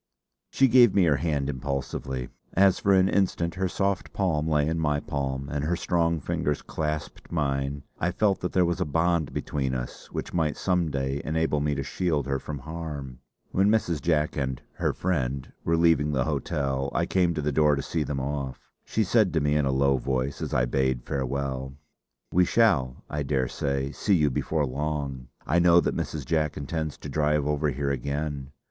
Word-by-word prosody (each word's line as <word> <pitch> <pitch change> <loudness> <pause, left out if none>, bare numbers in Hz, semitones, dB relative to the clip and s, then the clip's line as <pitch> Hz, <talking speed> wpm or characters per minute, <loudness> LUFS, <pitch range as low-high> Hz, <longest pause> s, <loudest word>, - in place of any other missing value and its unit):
She 135 - +4
gave 120 -4 +6
me 100 - +5
her 75 -5 +3
hand 75 -4 -1
impulsively. 65 -2 -3 0.2
As 95 0 +4
for 100 - +2
an 95 -1 +5
instant 90 -4 +1
her 95 0 -1
soft 100 0 -1
palm 80 -6 0
lay 75 -2 +2
in 80 +1 0
my 75 -2 +1
palm 70 -1 -3
and 75 0 -2
her 85 +4 +1
strong 85 -1 +1
fingers 75 +1 -2
clasped 75 -1 -4
mine, 70 -3 -1 0.2
I 85 - +1
felt 100 +1 +1
that 90 - -3
there 90 -1 +3
was 85 0 -1
a - - +2
bond 80 +1 +1
between 65 -3 -2
us - - -6
which - - -5
might 80 -3 0
some 90 -3 +1
day 70 0 -2
enable 80 -1 0
me 75 0 0
to 70 - -2
shield 75 -3 -1
her 70 0 -1
from 75 +1 -6
harm. 75 -3 -6 0.3
When 95 +2 +3
Mrs. 90 -8 +1
Jack, 75 -1 +1
and 65 -3 -2
'her - - 0
friend', 70 -7 -2
were 85 0 +2
leaving 80 -3 +3
the 65 -3 +1
hotel, 70 0 -1
I - - +2
came 90 -3 +1
to 75 - -1
the 75 - +1
door 75 0 +4
to 70 - -3
see 80 - -2
them 75 -2 -2
off. 70 -1 -4
She 110 - 0
said 105 0 +3
to 80 - +3
me, 75 0 +1
in 75 -1 +2
a - - +2
low 70 0 +3
voice, 65 +1 -2
as - - -3
I - - +2
bade 65 -1 0
farewell: 65 0 -3 0.6
"We 90 - +5
shall, 80 - +2
I 75 - -3
daresay, 70 0 -1
see 100 +5 +1
you 75 -4 +3
before 75 +4 0
long. 70 -2 -3 0.2
I 85 +3 +2
know 85 0 +6
that - - 0
Mrs. 75 -4 -3
Jack 75 +1 0
intends 80 +1 -3
to - - -8
drive 75 0 +1
over 75 +1 +1
here 70 +1 -1
again. 70 +1 -3
75 Hz, 195 wpm, -26 LUFS, 70-85 Hz, 0.6 s, gave